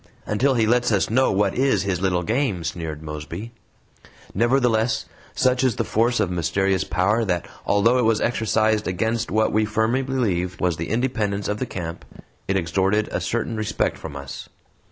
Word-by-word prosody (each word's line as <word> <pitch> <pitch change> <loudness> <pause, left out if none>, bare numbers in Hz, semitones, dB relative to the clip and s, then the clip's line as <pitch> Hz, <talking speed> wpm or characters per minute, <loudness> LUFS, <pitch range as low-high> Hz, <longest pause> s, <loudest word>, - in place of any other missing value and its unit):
"Until 130 +6 +1
he 115 -2 +3
lets 120 +2 +2
us 100 0 +1
know 130 +3 +3
what 100 +2 +1
is 135 -3 +2
his 95 -3 -1
little 90 -2 +1
game," 110 -4 0
sneered 80 -2 -5
Mosby. 75 +8 -6 0.8
Nevertheless, 120 0 +2 0.3
such 130 0 +2
is 130 -4 +2
the - - 0
force 120 +2 +1
of 90 - +1
mysterious 90 +2 +1
power 100 +6 +1
that 90 -5 -1 0.2
although 115 +5 +3
it 125 - +2
was 110 -1 +3
exercised 110 -2 +1
against 110 +5 -1
what 110 0 +2
we 110 +1 +3
firmly 110 +4 +1
believed 100 -10 -1
was 90 -3 0
the 85 - -4
independence 110 -4 -1
of 105 +1 -2
the - - -2
camp, 85 -2 -6 0.4
it 95 - +1
extorted 95 +5 +1
a - - -2
certain 120 0 -2
respect 110 -1 -1
from 75 -3 -8
us. 70 0 -8
105 Hz, 175 wpm, -23 LUFS, 90-115 Hz, 0.8 s, he